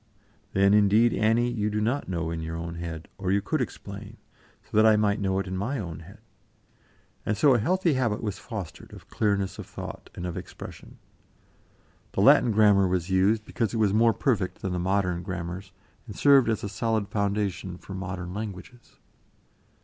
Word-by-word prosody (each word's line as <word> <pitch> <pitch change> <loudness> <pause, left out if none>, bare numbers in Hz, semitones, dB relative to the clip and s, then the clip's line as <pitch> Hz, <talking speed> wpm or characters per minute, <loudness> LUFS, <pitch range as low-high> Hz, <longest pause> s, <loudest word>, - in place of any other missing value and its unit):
"Then, 100 +1 +4
indeed, 105 +3 +5
Annie, 115 +3 +2
you 105 -3 -1
do 105 0 -1
not 120 +5 -1
know 85 -2 -2
in 80 -1 -4
your 80 +1 -5
own 85 0 -5
head, 85 -1 -6
or 95 -1 -1
you 100 - +3
could - - -1
explain, - - -7 0.5
so - - -11
that 110 - +6
I 110 -1 +6
might 105 0 +2
know 95 -1 0
in 95 -1 -3
my 115 +9 -2
own 85 - -5
head." 95 +6 -13 1.1
And 105 - -1
so 145 -3 +5
a 120 - +3
healthy 175 - +2
habit 120 -6 0
was 105 -2 -3
fostered 100 -9 -8
of - - -13
clearness 100 -3 0
of - - -7
thought - - -8
and 90 - -5
of 90 - -4
expression. - - -10 1.2
The - - 0
Latin 125 - +6
grammar 105 -3 +5
was 90 0 -1
used 100 +4 +2
because 115 -1 -2
it - - 0
was 105 -3 +2
more 115 +2 +5
perfect 105 -4 -1
than 95 - -2
the 90 - -1
modern 90 -1 0
grammars, 90 +1 -6 0.4
and 105 - -8
served 140 -4 +5
as 110 - -1
a - - -2
solid 110 0 -1
foundation 100 -3 -2
for 95 - -10
modern 90 -1 -5
languages. 105 +3 -8
100 Hz, 185 wpm, -26 LUFS, 90-110 Hz, 1.2 s, that